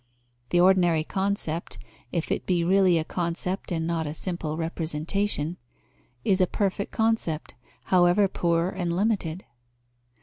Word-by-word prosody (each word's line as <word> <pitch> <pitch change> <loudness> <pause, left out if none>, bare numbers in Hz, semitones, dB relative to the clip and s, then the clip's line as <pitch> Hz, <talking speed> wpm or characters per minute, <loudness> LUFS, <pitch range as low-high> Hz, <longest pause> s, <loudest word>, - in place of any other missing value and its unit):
The 175 - +3
ordinary 175 -3 +4
concept, 190 -3 -1 0.3
if 165 - -2
it - - -2
be 175 -2 +2
really 185 0 +4
a 160 - 0
concept 175 +3 -2
and 160 -2 -1
not 165 -2 -1
a 150 - -4
simple 165 -3 -3
representation, 165 +1 -1 0.7
is 190 -1 +3
a 185 - +4
perfect 200 +1 -1
concept, 220 -9 0 0.3
however 180 +2 +4
poor 170 -1 0
and 175 -3 -2
limited. 190 -4 -1
175 Hz, 130 wpm, -26 LUFS, 165-190 Hz, 0.7 s, ordinary